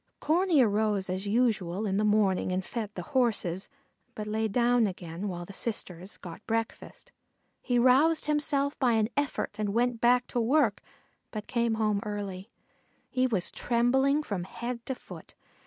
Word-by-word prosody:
Corney 330 -2 +3
arose 210 -3 +1
as 190 +2 -3
usual 215 -4 +1
in 195 -1 0
the 210 - +2
morning 205 -3 +2
and 185 +1 -1
fed 225 -4 -4
the - - -5
horses, 205 -8 0 0.5
but 210 - -5
lay 220 +1 -1
down 240 +1 +3
again 180 0 -6
while 175 -2 -5
the 200 - -11
sisters 190 -4 -3
got 175 +3 -10
breakfast. 225 0 -4 0.5
He 245 - 0
roused 270 +7 +4
himself 290 -1 0
by 250 -3 +3
an 220 -1 +2
effort 285 -1 -1
and 205 -1 -1
went 240 -1 +1
back 245 +1 +4
to 240 - 0
work, 275 +7 +2 0.5
but 210 -1 -6
came 235 -2 0
home 215 -2 +1
early. 200 -1 -5 0.6
He 255 0 +2
was 200 -8 -1
trembling 265 +5 +2
from 195 -9 -3
head 235 +4 -5
to 265 - -2
foot. - - -12
220 Hz, 160 wpm, -29 LUFS, 200-250 Hz, 0.6 s, roused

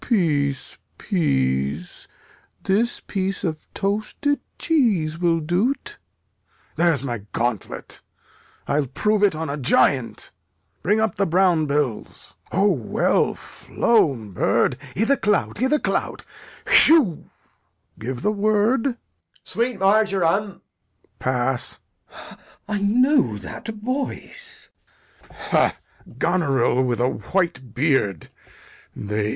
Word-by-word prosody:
Peace, 145 - 0 0.2
peace; 70 - -1 0.6
this 220 +5 0
piece 195 0 -3
of 155 -4 -4
toasted 215 +8 -1 0.2
cheese 200 - +1
will 170 -2 +2
do't. 225 - -1 0.8
There's 165 -6 +2
my 120 -4 -3
gauntlet; 120 -4 -3 0.7
I'll 145 -1 0
prove 210 - 0
it 200 -5 +3
on 160 +1 -3
a 145 0 -3
giant. 130 -2 +1 0.5
Bring 210 +6 +2
up 220 -4 +1
the 200 - 0
brown 175 -2 +3
bills. 140 -6 -3 0.2
O, 195 +3 +3
well 125 - +1
flown, 135 - 0
bird! 90 - +1 0.2
i' 220 - +2
th' 280 +4 +1
clout, 210 +1 0
i' 260 - +3
th' 300 +2 +1
clout! - - -2 0.4
Hewgh! 290 - +5 0.7
Give 120 +2 -5
the 210 - +2
word. 215 +3 +2
Edg. 245 -3 -3 0.5
Sweet 235 -1 -2
marjoram. 195 -1 +2
Lear. 195 - -15 0.6
Pass. 130 0 -1 0.3
Glou. - - -13 0.3
I 210 -1 -1
know 220 - +3
that 100 - -9
voice. 275 - -6 0.5
Lear. - - -21
Ha! - - +1 0.4
Goneril 140 -8 +1
with 120 -2 -1
a 125 - +2
white 135 - -2
beard? 125 - 0
175 Hz, 110 wpm, -22 LUFS, 135-215 Hz, 0.8 s, Hewgh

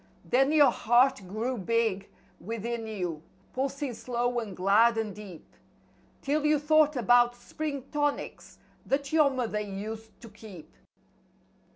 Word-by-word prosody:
Then 270 +3 +2
your 300 -2 +6
heart 245 +2 +3
grew 225 +5 -3
big, 220 -1 -1 0.3
within 230 +2 -4
you, 180 -7 -4 0.3
pulsing 275 0 -3
slow 245 +1 -2
and 205 -5 -7
glad 215 +5 +4
and 220 -2 -2
deep 195 -5 -11 0.4
" - - -34
'Til 290 +2 0
you 300 0 +3
thought 300 0 +3
about 245 +1 +4
spring 280 +2 -5
tonics 290 -1 -3 0.3
that 280 +1 -2
your 305 -3 +5
mother 245 -5 -2
used 210 +2 -7
to 230 - -11
keep. 205 -6 -13
235 Hz, 135 wpm, -28 LUFS, 210-275 Hz, 0.4 s, your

